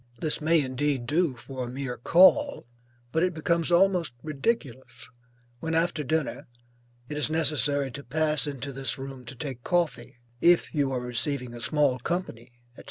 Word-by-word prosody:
This 155 -1 -1
may 165 +2 +3
indeed 135 -1 -1
do 150 +1 +1
for 130 +1 -7
a 120 - -5
mere 130 0 -4
call; 190 - +4 0.5
but 160 - +1
it 180 -1 +1
becomes 170 +1 +1
almost 175 -5 +3
ridiculous 135 - -3 0.5
when, 160 +3 -2
after 165 -2 0
dinner, 155 +1 -2 0.6
it 150 - -5
is 150 - +2
necessary 145 -3 +1
to 140 +3 -8
pass 150 +1 +1
into 140 -1 -5
this 135 0 +1
room 135 -1 -8
to 120 - -8
take 130 -3 -6
coffee, 170 -6 -1 0.2
if 175 0 +4
you 140 -3 +1
are 130 - -1
receiving 125 +1 -2
a 120 - -7
small 145 -2 +2
company, 125 -6 -4 0.2
&c. - - -16
145 Hz, 165 wpm, -27 LUFS, 130-160 Hz, 0.6 s, call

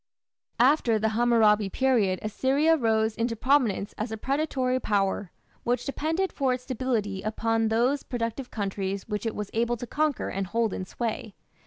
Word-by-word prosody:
After 245 -3 +4
the 220 +1 +1
Hammurabi 220 -3 +3
period 220 -6 +2
Assyria 275 +9 +2
rose 220 -5 +1
into 230 0 -1
prominence 235 -5 +1
as 215 +1 -3
a 220 - -3
predatory 265 0 0
power, 200 -4 0 0.3
which 245 +1 0
depended 320 +7 -1
for 265 -3 +1
its 250 - -10
stability 230 -7 -2
upon 225 +1 0
those 245 +6 +2
productive 240 +1 -4
countries 195 -2 -3
which 210 +1 -2
it 225 - -3
was 210 -1 -5
able 235 +1 0
to 245 - -6
conquer 295 +3 -1
and 195 0 -3
hold 225 +1 0
in 185 - -4
sway. 225 +1 -4
230 Hz, 160 wpm, -27 LUFS, 215-260 Hz, 0.3 s, After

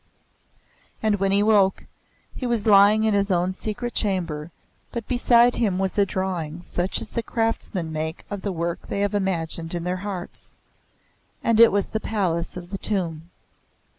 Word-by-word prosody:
And 215 -1 +2
when 195 0 +1
he 200 +1 +5
awoke, 205 -3 +3 0.5
he 255 - -4
was 235 -3 0
lying 210 +1 +6
in 220 -1 +2
his 200 0 +1
own 180 0 +1
secret 225 +5 -5
chamber, 170 -7 -1 0.4
but 235 -2 -5
beside 245 -1 +4
him 205 -6 0
was 190 0 -1
a 200 -1 +3
drawing 175 -4 -3
such 180 +2 -1
as - - -7
the 235 - -1
craftsmen 225 -7 -2
make 160 +1 -4
of 205 -2 -5
the 200 - -2
work 170 -1 -3
they 200 - -2
have 205 0 0
imagined 170 -4 -2
in 170 - -3
their 180 +1 -1
hearts. 190 -2 -7 0.9
And 230 -1 +2
it 230 - +8
was 200 0 +1
the 220 - -2
Palace 180 -7 -2
of 175 +1 -9
the 195 - -4
Tomb. 170 -5 -2
195 Hz, 170 wpm, -24 LUFS, 175-215 Hz, 0.9 s, it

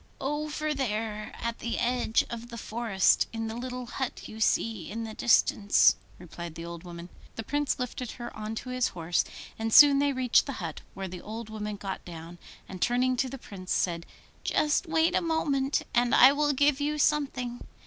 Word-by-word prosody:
'Over 300 +2 -2
there, 215 -5 -3
at 235 0 -3
the 235 - -3
edge 240 -2 +1
of 235 0 -6
the 235 - -8
forest 220 -3 +2
in 225 -1 -4
the 220 - -4
little 250 +1 -5
hut 255 +1 -5
you 220 - -10
see 220 -4 0
in 225 +2 -4
the 220 -1 -6
distance,' 210 -3 +4 0.2
replied 170 -1 -9
the 165 - -7
old 170 0 -8
woman. 175 0 -9 0.3
The 225 - -5
Prince 290 +4 -1
lifted 250 -2 -4
her 240 -1 -8
on 215 +1 -5
to 255 - -6
his 255 -1 +1
horse, 165 0 +1 0.4
and 225 0 -2
soon 285 +2 +9
they 285 0 +2
reached 255 -1 +3
the 280 - -3
hut, 165 -9 -6
where 190 0 -4
the 180 -1 -8
old 220 +1 -7
woman 210 -1 -4
got 195 -1 -6
down, 170 0 -10 0.3
and 185 -2 -9
turning 250 +1 +2
to 260 +1 0
the 270 - -6
Prince 190 -6 -6
said, 170 -2 -1 0.4
'Just 305 +4 +1
wait 320 0 +2
a - - +3
moment, 290 -5 0
and 240 0 +3
I 260 +2 +9
will 290 0 +2
give 285 0 +2
you 300 +1 0
something. 265 -5 0
235 Hz, 190 wpm, -28 LUFS, 205-270 Hz, 0.4 s, soon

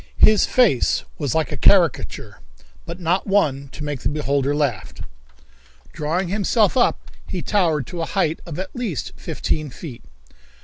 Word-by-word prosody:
His 215 -1 +6
face 230 - +3 0.2
was 145 -3 -1
like 160 -2 0
a - - -2
caricature, 175 -7 +2 0.5
but - - -6
not 180 +3 0
one 145 -9 +1
to 150 - -8
make 145 -2 -3
the - - -1
beholder 145 -1 0
laugh. 125 - -2 1.0
Drawing 165 +4 -1
himself 205 +2 +2
up, 250 - +1 0.2
he 180 - -4
towered 165 - +1
to 170 +5 -6
a - - -1
height 165 -5 0
of 160 - -6
at 190 +1 -6
least 225 - -3
fifteen 155 -2 -3
feet. 130 -2 -9
160 Hz, 150 wpm, -21 LUFS, 145-195 Hz, 1.0 s, His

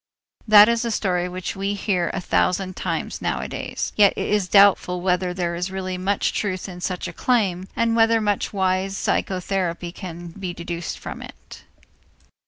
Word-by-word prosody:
That 210 -1 +9
is 235 0 +1
a 235 - -1
story 180 -5 0
which 185 +1 -5
we 195 +1 -2
hear 185 -4 0
a - - -3
thousand 185 0 0
times - - -3
nowadays. - - -3
Yet 205 -2 +5
it - - -3
is 205 -3 +1
doubtful 195 -2 +5
whether 180 0 0
there 175 -1 -2
is 175 +2 -3
really 190 -1 -4
much 190 +2 0
truth 185 -3 -2
in 180 -2 -9
such 180 0 -3
a 170 - -7
claim 190 -5 0
and 230 0 +1
whether 225 0 +4
much 205 -2 -1
wise 190 0 0
psychotherapy 180 -2 -1
can 175 -2 -8
be 180 0 -6
deduced 170 -1 -5
from - - -8
it. - - -12
185 Hz, 170 wpm, -22 LUFS, 180-205 Hz, -, That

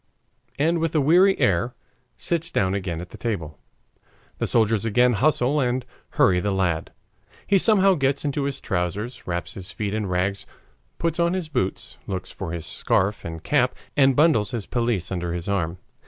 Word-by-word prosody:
and 165 +4 +2
with 165 0 -1
a - - +4
weary 180 +7 +4
air 100 +6 +1 0.4
sits 165 -1 -1
down 95 - +1
again 90 -4 -3
at 90 - -9
the - - -12
table. 85 -10 -4 0.8
The - - 0
soldiers 110 -2 +3
again 120 +3 +3
hustle 140 +3 +2
and 125 -1 0 0.3
hurry 90 -2 +5
the 100 - -1
lad. 90 -5 0 0.5
He 200 -1 +3
somehow 195 -2 +5
gets 140 -3 0
into 140 -1 -1
his 140 -1 -3
trousers, 95 +6 -3
wraps 85 -1 -3
his 95 -1 -8
feet 105 -2 -3
in 110 -2 -1
rags, 95 +2 -1 0.5
puts 165 0 -1
on 170 +1 +2
his 180 -4 -3
boots, 125 -10 -3
looks 95 -1 -4
for 80 - -6
his 85 -2 -5
scarf 100 +6 0
and 80 -1 -7
cap, - - +2 0.2
and 135 -2 +4
bundles 145 -9 +4
his 115 -6 -4
pelisse 115 -8 -1
under 90 -2 -2
his 90 +2 -5
arm. 90 -4 -1
110 Hz, 175 wpm, -24 LUFS, 95-145 Hz, 0.8 s, hurry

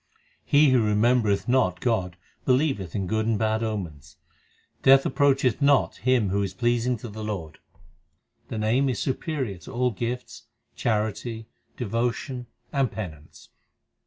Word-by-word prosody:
He 145 -1 +5
who 125 -2 +4
remembereth 105 -1 +2
not 120 -8 +2
God 95 -8 -1 0.3
believeth 130 - +1
in 100 -2 -1
good 110 +4 -1
and 115 -2 +2
bad 110 0 0
omens. 85 -10 -5 0.6
Death 135 0 +6
approacheth 135 -4 +2
not 140 -1 +3
him 125 -6 +2
who 100 +2 0
is 95 -1 -3
pleasing 120 +1 +1
to 120 - -8
the 110 0 -7
Lord. 95 -8 -5 0.9
The - - -5
Name 120 +6 +2
is 125 - -1
superior 130 - -2
to 90 - -11
all 125 0 +1
gifts, 120 +3 -5 0.3
charity, 110 +1 -2 0.3
devotion, 120 +2 -2 0.3
and 135 -4 +1
penance. 80 -8 -9
115 Hz, 135 wpm, -25 LUFS, 105-125 Hz, 0.9 s, Death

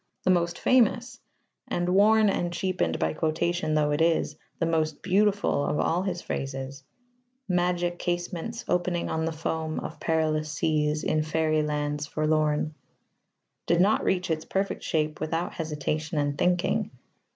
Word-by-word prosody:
The 185 - +3
most 170 -1 +1
famous 245 0 +2 0.5
and, 175 0 -1
worn 210 +3 +5
and 175 -3 0
cheapened 175 - -1
by 80 0 0
quotation 160 - 0
though 150 -1 +2
it 145 +2 0
is, 165 -2 +2 0.2
the 165 - 0
most 160 -2 0
beautiful 200 -5 +2
of 150 - -1
all 170 +2 +1
his 185 -2 -3
phrases 135 0 -5 0.6
magic 175 -1 0
casements, 175 +6 -3
opening 175 -1 0
on 160 0 0
the 165 - -1
foam 160 0 -3
Of - - -7
perilous 155 -2 0
seas, 155 -1 0
in 155 - +1
faery 155 0 +1
lands 150 0 -2
forlorn 155 0 +1 0.9
did 170 0 +3
not 200 +4 +3
reach 180 -2 0
its 155 0 -1
perfect 195 +1 -2
shape 155 -2 -1
without 165 +2 -2
hesitation 155 -1 -3
and 145 -1 0
thinking. 180 +3 +1
160 Hz, 145 wpm, -27 LUFS, 155-180 Hz, 0.9 s, worn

